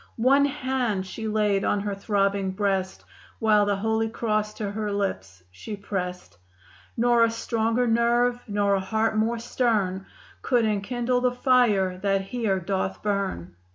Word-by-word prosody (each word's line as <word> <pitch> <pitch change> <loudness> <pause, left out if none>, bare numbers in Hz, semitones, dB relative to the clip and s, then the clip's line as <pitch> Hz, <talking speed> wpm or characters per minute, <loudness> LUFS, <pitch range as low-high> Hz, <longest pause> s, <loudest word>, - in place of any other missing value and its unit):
One 270 +4 +4
hand 260 -8 -1
she 220 +4 -6
laid 210 -2 +1
on 205 - +1
her 205 0 -3
throbbing 200 -1 0
breast, 190 -2 -2 0.3
While 210 -2 +3
the 205 - +2
Holy 220 +2 0
Cross 215 -2 -1
to 205 -2 -4
her 210 0 -3
lips 95 - -3
she 205 - -7
pressed. 180 - -5 0.6
"Nor 240 0 +4
a 230 - +4
stronger 230 +1 0
nerve; 240 +1 +2
nor 205 -1 +1
a 195 - +2
heart 220 +3 0
more 225 +2 +1
stern 215 -6 -1 0.3
Could 245 -3 +2
enkindle 240 +4 0
the 250 0 +2
fire 240 -8 +2
that 195 0 +1
here 195 -1 -1
doth 190 +1 -3
burn. 195 - -2
210 Hz, 150 wpm, -25 LUFS, 195-235 Hz, 0.6 s, One